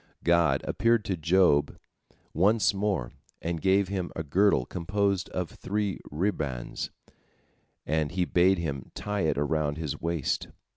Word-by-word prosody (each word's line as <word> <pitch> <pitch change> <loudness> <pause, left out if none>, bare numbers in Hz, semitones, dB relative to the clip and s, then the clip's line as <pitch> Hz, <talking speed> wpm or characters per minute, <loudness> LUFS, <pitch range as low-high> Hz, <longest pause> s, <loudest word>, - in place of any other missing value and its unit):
God 85 -1 +3
appeared 115 +1 +2
to 95 - -1
Job 80 -3 +3 0.6
once 100 +5 +3
more, 95 -11 -1 0.3
and 85 -1 -3
gave 95 0 +3
him 95 -2 -3
a 80 - -3
girdle 85 -3 +3
composed 100 +3 -1
of 90 -3 -3
three 100 -1 -2
ribands, 75 -7 -2 1.0
and 75 0 0
he 90 -1 0
bade 90 +2 +3
him 70 -6 -4
tie 105 -1 -2
it 80 -3 +1
around 75 0 0
his 80 -4 -4
waist. 85 -4 -1
85 Hz, 135 wpm, -28 LUFS, 75-100 Hz, 1.0 s, God